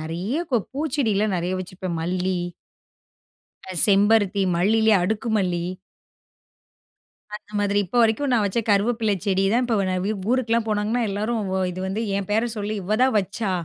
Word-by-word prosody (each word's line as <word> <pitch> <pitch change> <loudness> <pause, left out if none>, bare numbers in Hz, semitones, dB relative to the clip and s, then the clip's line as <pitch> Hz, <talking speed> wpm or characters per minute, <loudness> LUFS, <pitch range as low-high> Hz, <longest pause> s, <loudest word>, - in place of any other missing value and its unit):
நெறைய 175 - -3
ப 245 -3 +2
பூச்செடியிலாம் 240 -9 0
நெறைய 175 +1 -2
வச்சுப்பேன், 185 -1 -6
மல்லி 180 +2 -1 1.3
அ - - -5
செம்பருத்தி. 205 0 +3
மல்லிலயே 220 +4 +3
அடுக்கு 220 +4 -2
மல்லி. 180 -3 -1 1.7
அந்த 210 0 -13
மாதிரி. 205 0 +1
இப்போ 245 - -3
வரைக்கும் 230 +5 +1
நான் 225 -3 +3
வச்ச 200 +4 0
கருவேப்பில 220 +2 +2
செடி 195 -1 +1
தான் 245 +2 +2
இப்ப 235 -2 0
நான் 185 0 -1
வு - - 0 0.2
ஊருக்குலாம் 235 -3 +1
போனாங்கன்னா, 215 +3 0
எல்லாரும் 215 +4 -2
வ 190 - 0
"இது 180 - -7
வந்து, 200 +4 -2
என் 200 -1 -2
பேர 220 +3 +2
சொல்லி 210 +1 -3
இவ 200 +4 0
தான் 260 - +2
வச்சா! 200 +1 -3
210 Hz, 155 wpm, -23 LUFS, 190-225 Hz, 1.7 s, செம்பருத்தி